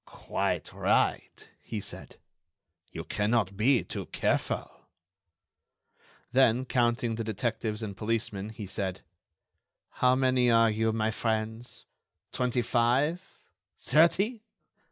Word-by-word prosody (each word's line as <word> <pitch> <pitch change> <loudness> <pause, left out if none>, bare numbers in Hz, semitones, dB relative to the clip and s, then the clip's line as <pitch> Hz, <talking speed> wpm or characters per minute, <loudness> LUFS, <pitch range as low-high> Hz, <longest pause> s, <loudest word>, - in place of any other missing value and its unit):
"Quite - - -3
right," - - 0
he 110 - -5
said. - - -7 0.7
"You - - -6
cannot 105 -2 0
be 120 +5 +3
too - - -6
careful." - - -2 1.4
Then, 130 -1 +3
counting 120 -1 +1
the 115 +1 -3
detectives 110 0 -3
and 100 -2 -5
policemen, 105 -2 -2
he 110 -1 -7
said: 95 -1 -4 1.0
"How 125 0 +5
many 130 -1 +2
are 115 -1 +5
you, 110 +1 +1
my 110 0 0
friends? 110 +2 -3 0.5
Twenty 125 -1 0
five? 130 +9 +1 0.6
Thirty? 200 +9 +2
115 Hz, 105 wpm, -29 LUFS, 110-125 Hz, 1.4 s, How